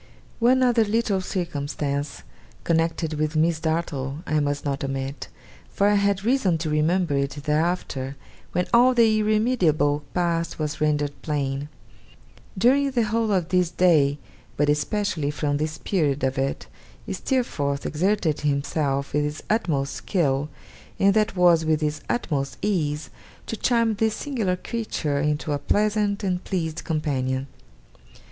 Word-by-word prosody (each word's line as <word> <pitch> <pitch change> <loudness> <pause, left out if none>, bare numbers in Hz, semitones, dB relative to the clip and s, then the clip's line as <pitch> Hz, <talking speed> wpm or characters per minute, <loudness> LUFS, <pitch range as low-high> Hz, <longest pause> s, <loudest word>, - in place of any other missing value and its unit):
One 255 +2 +4
other 240 -2 +4
little 215 -2 0
circumstance 145 -5 -3 0.4
connected 165 -1 0
with 155 +1 -1
Miss 160 +1 +2
Dartle 155 -3 -2
I 155 - +1
must 145 0 -1
not 140 -1 -2
omit; 135 +1 -4 0.4
for 200 - +2
I 205 - +4
had 200 -1 +2
reason 225 -9 +2
to 160 -1 -3
remember 160 +2 +1
it 140 0 +1
thereafter, 150 -4 -1 0.4
when 180 0 0
all 250 +2 +6
the 225 -2 +4
irremediable 210 - +2
past 170 -2 0
was 150 -1 -3
rendered 150 -1 +1
plain. 140 -1 -2 0.9
During 270 +7 +4
the 245 -3 +1
whole 220 0 0
of 180 -4 +1
this 180 -2 +2
day, 160 -6 +3 0.4
but 145 0 +2
especially 150 +1 0
from 145 -1 -1
this 155 +1 -2
period 150 -7 0
of 135 0 0
it, 135 +1 -2 0.5
Steerforth 145 - -1
exerted 170 -1 0
himself 140 -1 -1
with 150 - +2
his 150 +1 -4
utmost 155 -10 0
skill, 145 -6 0 0.5
and 195 0 +4
that 215 -1 +1
was 175 -3 +5
with 160 -1 +1
his 150 0 -1
utmost 140 - -1
ease, 150 -8 -1 0.3
to - - -4
charm 230 -1 +2
this 220 +1 0
singular 225 -11 -1
creature 180 -9 -3
into 150 +1 -1
a 145 - 0
pleasant 210 +3 +1
and 180 -2 -1
pleased 165 -4 -3
companion. 135 -4 -1
160 Hz, 140 wpm, -24 LUFS, 145-200 Hz, 0.9 s, all